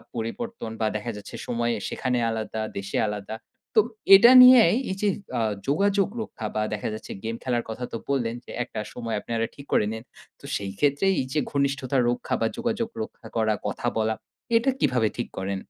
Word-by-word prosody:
পরিবর্তন 115 Hz, -, -4 dB
বা 110 Hz, -, +2 dB
দেখা 110 Hz, +3 st, -3 dB
যাচ্ছে, 105 Hz, -, -9 dB
সময়ে 120 Hz, 0 st, 0 dB
সেখানে 125 Hz, -2 st, -1 dB
আলাদা, 110 Hz, 0 st, -3 dB, 0.2 s
দেশে 100 Hz, 0 st, -3 dB
আলাদা। 105 Hz, +1 st, -5 dB, 0.4 s
তো -, -, +7 dB, 0.4 s
এটা 235 Hz, +5 st, +8 dB
নিয়াই 250 Hz, -7 st, +8 dB, 0.2 s
এই 190 Hz, -, -4 dB
যে, 205 Hz, -, +3 dB, 0.3 s
আ -, -, +1 dB, 0.3 s
যোগাযোগ 195 Hz, +6 st, +2 dB
রক্ষা 115 Hz, -, -7 dB
বা 110 Hz, -, +1 dB
দেখা 105 Hz, -, -3 dB
যাচ্ছে 110 Hz, -, -8 dB
গেম 115 Hz, +1 st, -3 dB
খেলার 120 Hz, -2 st, 0 dB
কথা 110 Hz, +3 st, -5 dB
তো -, -, -1 dB
বললেন 120 Hz, -4 st, 0 dB
যে, -, -, -10 dB
একটা 115 Hz, -3 st, -7 dB
সময় 115 Hz, -2 st, -4 dB
আপনারা 115 Hz, +1 st, -2 dB
ঠিক 140 Hz, -, -11 dB
করে -, -, +4 dB
নিন। 110 Hz, +1 st, -6 dB, 0.4 s
তো -, -, -14 dB
সেই 100 Hz, -1 st, -3 dB
ক্ষেত্রে 145 Hz, +4 st, +2 dB
এই 130 Hz, -, -1 dB
যে 155 Hz, -, +2 dB
ঘনিষ্ঠতা 140 Hz, -1 st, 0 dB
রক্ষা 120 Hz, -, -2 dB
বা 115 Hz, -, +3 dB
যোগাযোগ 235 Hz, -1 st, -1 dB
রক্ষা 220 Hz, -, -11 dB
করা, 110 Hz, -1 st, +2 dB
কথা 120 Hz, -, -3 dB
বলা, 110 Hz, 0 st, +1 dB, 0.4 s
এটা 230 Hz, +4 st, +4 dB
কিভাবে 120 Hz, -4 st, +2 dB
ঠিক 120 Hz, -, -2 dB
করেন? 95 Hz, 0 st, -2 dB
120 Hz, 185 wpm, -25 LUFS, 110-155 Hz, 0.4 s, এটা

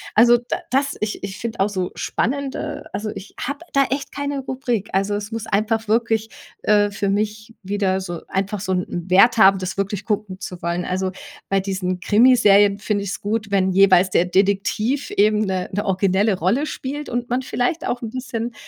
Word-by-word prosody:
Also, 240 Hz, +2 st, +7 dB
d 240 Hz, -, -4 dB, 0.2 s
das 275 Hz, +2 st, +1 dB
ich 210 Hz, -1 st, -3 dB
ich 190 Hz, -1 st, -5 dB
finde 230 Hz, 0 st, -5 dB
auch 205 Hz, -, +2 dB
so 185 Hz, -3 st, -3 dB
spannende 275 Hz, +2 st, -2 dB
also, 210 Hz, +1 st, -3 dB
ich 195 Hz, -, -9 dB
habe 280 Hz, +2 st, -3 dB
da 275 Hz, -1 st, +4 dB
echt 275 Hz, 0 st, -2 dB
keine 285 Hz, 0 st, -3 dB
Rubrik. 255 Hz, -6 st, -3 dB
Also, 195 Hz, +2 st, +1 dB
es 205 Hz, +2 st, -5 dB
muss 225 Hz, -1 st, -5 dB
einfach 220 Hz, +2 st, 0 dB
wirklich, 225 Hz, 0 st, +1 dB, 0.3 s
äh, 205 Hz, -1 st, +3 dB
für 200 Hz, 0 st, -2 dB
mich 215 Hz, +2 st, -2 dB
wieder 190 Hz, -1 st, 0 dB
so, 175 Hz, -3 st, -6 dB
einfach 195 Hz, +1 st, -2 dB
so 190 Hz, -, -3 dB
'n 180 Hz, -1 st, -3 dB
Wert 210 Hz, +6 st, +6 dB
haben, 195 Hz, -2 st, +7 dB
das 185 Hz, +1 st, -4 dB
wirklich 195 Hz, 0 st, -2 dB
gucken 210 Hz, -3 st, -2 dB
zu 180 Hz, -2 st, -7 dB
wollen. 170 Hz, +1 st, -1 dB
Also, 185 Hz, 0 st, -1 dB, 0.4 s
bei 195 Hz, 0 st, +2 dB
diesen 185 Hz, -2 st, -2 dB
Krimiserien 205 Hz, -2 st, +5 dB
finde 205 Hz, -2 st, -1 dB
ich -, -, -4 dB
es -, -, -5 dB
gut, 215 Hz, 0 st, -2 dB
wenn 190 Hz, -1 st, +2 dB
jeweils 185 Hz, -1 st, +5 dB
der 175 Hz, -, +3 dB
Detektiv 200 Hz, +8 st, 0 dB
eben 210 Hz, +1 st, +3 dB
'ne 185 Hz, -1 st, -2 dB
'ne 205 Hz, -, -1 dB
originelle 195 Hz, +1 st, +2 dB
Rolle 215 Hz, -, +1 dB
spielt 290 Hz, 0 st, -5 dB
und 240 Hz, 0 st, -3 dB
man 250 Hz, +2 st, 0 dB
vielleicht 260 Hz, +5 st, -1 dB
auch 245 Hz, -, -2 dB
'n 230 Hz, -, -4 dB
bisschen, 240 Hz, -2 st, -4 dB
205 Hz, 195 wpm, -21 LUFS, 190-235 Hz, 0.4 s, Also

